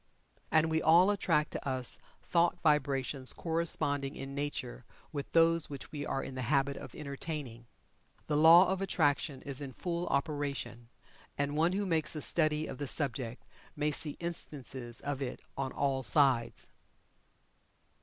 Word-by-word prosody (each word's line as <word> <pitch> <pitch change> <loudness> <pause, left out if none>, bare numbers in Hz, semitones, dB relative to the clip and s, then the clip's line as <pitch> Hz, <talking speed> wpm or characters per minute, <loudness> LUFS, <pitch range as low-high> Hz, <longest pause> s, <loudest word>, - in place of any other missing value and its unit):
And 160 +1 +3
we 160 0 +1
all 175 +6 +6
attract 155 -6 +1
to - - -5
us 130 -2 +2 0.2
thought 175 0 +1
vibrations 140 -3 +1
corresponding 145 -4 0
in 135 0 -7
nature 140 - -4 0.3
with 145 -2 -5
those 165 -1 +3
which 140 -2 -8
we 145 -1 -5
are 135 - -2
in - - -7
the 130 - -4
habit 140 +2 +1
of - - -10
entertaining. 140 -5 -6 0.6
The 150 - -1
Law 165 +4 +8
of 190 0 -1
Attraction 145 -6 0
is 140 -1 -2
in 135 -2 -6
full 175 +3 -3
operation, 140 -5 -3 0.5
and 145 +1 -1
one 165 +4 +2
who 200 +1 -1
makes 165 -3 0
a 155 - -4
study 155 -2 +1
of 130 - -7
the 145 - -3
subject 130 -4 0 0.3
may 150 0 0
see 150 0 +2
instances 135 -7 -3
of 140 -1 -4
it 130 - -4 0.2
on 135 -1 -3
all 135 -1 0
sides. 130 -3 +2
145 Hz, 155 wpm, -32 LUFS, 135-160 Hz, 0.6 s, Law